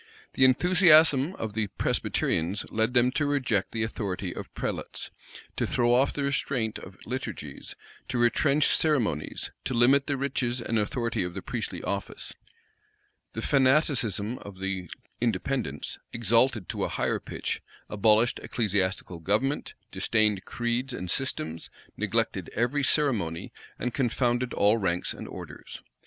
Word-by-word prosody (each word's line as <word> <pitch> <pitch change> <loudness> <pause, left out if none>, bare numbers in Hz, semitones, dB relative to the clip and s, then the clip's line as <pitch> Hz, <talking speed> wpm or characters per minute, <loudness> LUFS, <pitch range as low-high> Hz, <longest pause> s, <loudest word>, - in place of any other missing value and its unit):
The 130 - +5
enthusiasm 160 +1 +5
of 110 -2 -4
the 110 -1 0
Presbyterians 90 0 0
led 110 +3 0
them 125 +1 +5
to 145 +2 0
reject 130 -9 0
the 110 -1 -1
authority 100 -5 -3
of - - -7
prelates, - - -4 0.5
to - - 0
throw 120 0 +2
off 130 +3 +4
the 145 - -3
restraint 130 -5 -1
of 95 0 -12
liturgies, 115 - -6 0.3
to 125 - -2
retrench 140 +5 +3
ceremonies, 120 - 0
to 130 - -1
limit 135 +4 +4
the 140 - 0
riches 130 -2 -1
and 115 -1 0
authority 115 +3 -1
of 90 -1 -5
the - - -5
priestly - - -4
office: 100 0 -4 1.0
the 115 - -4
fanaticism 130 - +2
of 100 -2 -10
the 95 -2 -3 0.3
Independents, 115 - -2
exalted 115 -1 +2
to - - -2
a - - 0
higher - - 0
pitch, - - -4 0.3
abolished 110 +3 +3
ecclesiastical 95 -5 -1
government, 110 - 0 0.2
disdained 105 -4 +1
creeds 120 +2 -2
and 90 -5 -4
systems, 80 - -1 0.3
neglected - - -1
every 125 +6 +1
ceremony, 110 - +1 0.2
and 125 0 -3
confounded 120 -1 +1
all 105 +3 +4
ranks 90 -3 0
and - - -8
orders. - - -9
120 Hz, 135 wpm, -27 LUFS, 100-130 Hz, 1.0 s, The